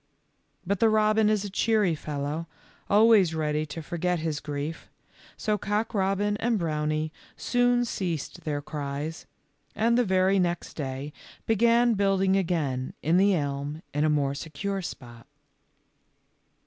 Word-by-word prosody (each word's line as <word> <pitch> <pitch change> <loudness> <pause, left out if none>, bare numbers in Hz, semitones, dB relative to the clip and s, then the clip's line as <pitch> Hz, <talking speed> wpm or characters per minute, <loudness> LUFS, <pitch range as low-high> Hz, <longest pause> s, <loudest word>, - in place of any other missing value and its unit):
But 200 +1 -1
the 225 - +5
robin 215 0 +3
is 210 -1 +1
a - - -4
cheery 210 -3 +2
fellow, 150 +1 -4 0.4
always 205 -5 +5
ready 155 0 -1
to 160 +2 -7
forget 175 +3 -1
his 155 -2 -2
grief, 145 +2 -5 0.5
so 210 -1 -1
Cock 210 +3 -1
robin 200 +1 +1
and 230 0 +1
Brownie 155 -2 -1 0.3
soon 245 0 +2
ceased 175 - -4
their 145 -2 -3
cries, 145 +2 -5 0.5
and 230 +2 +2
the - - +4
very 190 -1 +3
next 175 -1 -1
day 140 0 -5 0.3
began 235 +2 +4
building 195 -2 +2
again 155 -9 -1
in 165 +4 +3
the 195 +1 +4
elm 145 +1 -3
in 145 +1 +1
a 155 - +3
more 145 -2 +1
secure 160 +7 -4
spot. 120 -8 -9
175 Hz, 135 wpm, -27 LUFS, 150-205 Hz, 0.5 s, the